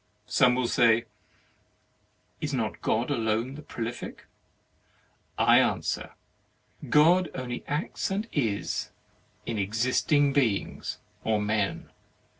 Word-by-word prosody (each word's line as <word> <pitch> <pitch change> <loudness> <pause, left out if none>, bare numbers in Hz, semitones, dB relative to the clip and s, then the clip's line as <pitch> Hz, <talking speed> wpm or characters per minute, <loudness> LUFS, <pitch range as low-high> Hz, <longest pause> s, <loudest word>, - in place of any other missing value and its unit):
Some 125 -1 +4
will 130 -1 0
say, 115 -1 +4 1.3
"Is - - -2
not - - -2
God - - 0
alone 115 +3 0
the 150 - -9
Prolific?" 115 -4 -6 1.1
I - - +6
answer: - - -1 0.7
"God 165 +5 +5
only 125 -2 -4
acts 150 +4 -2
and 200 +4 -2
is 110 -8 -1 0.6
in 110 -3 -2
existing 130 +7 +2
beings 120 -8 0 0.3
or 110 -1 +1
men." 105 -3 -1
120 Hz, 100 wpm, -27 LUFS, 110-145 Hz, 1.3 s, I